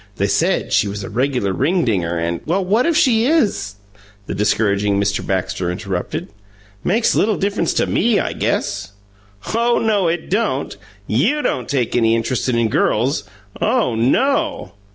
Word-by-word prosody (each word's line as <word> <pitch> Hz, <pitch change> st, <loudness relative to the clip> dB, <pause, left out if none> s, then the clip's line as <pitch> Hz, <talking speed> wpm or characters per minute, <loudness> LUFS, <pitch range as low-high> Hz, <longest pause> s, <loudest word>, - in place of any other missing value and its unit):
"They -, -, 0 dB
said -, -, 0 dB
she -, -, +3 dB
was 100 Hz, 0 st, -5 dB
a -, -, -7 dB
reg'lar 125 Hz, -6 st, 0 dB
ringdinger 110 Hz, -, 0 dB
and 85 Hz, +1 st, -2 dB
" -, -, -25 dB
"Well, 185 Hz, +4 st, 0 dB
what 220 Hz, -, +2 dB
if 335 Hz, -2 st, +2 dB
she 235 Hz, -2 st, +3 dB
is?" 205 Hz, -, +1 dB, 0.5 s
the -, -, -4 dB
discouraging 100 Hz, -1 st, +1 dB
Mr. 100 Hz, 0 st, 0 dB
Baxter 95 Hz, -1 st, -2 dB
interrupted. 90 Hz, 0 st, -4 dB, 0.5 s
"Makes 225 Hz, +5 st, +2 dB
little 215 Hz, -1 st, +2 dB
difference 200 Hz, +1 st, 0 dB
to -, -, +2 dB
ME, 230 Hz, -2 st, +2 dB
I -, -, -2 dB
guess!" 100 Hz, -, -2 dB, 0.6 s
"Oh 235 Hz, +1 st, +2 dB
no, 210 Hz, -5 st, +1 dB
it 165 Hz, 0 st, -2 dB
don't. 200 Hz, -9 st, -1 dB, 0.3 s
YOU 225 Hz, -, +1 dB
don't 125 Hz, -2 st, -2 dB
take 130 Hz, -5 st, 0 dB
any 115 Hz, -1 st, +3 dB
interest 115 Hz, +3 st, -1 dB
in 115 Hz, -2 st, +2 dB
girls! 125 Hz, +7 st, +1 dB, 0.4 s
OH 125 Hz, -, +1 dB
no!" 270 Hz, -, +1 dB
130 Hz, 155 wpm, -19 LUFS, -, 0.6 s, she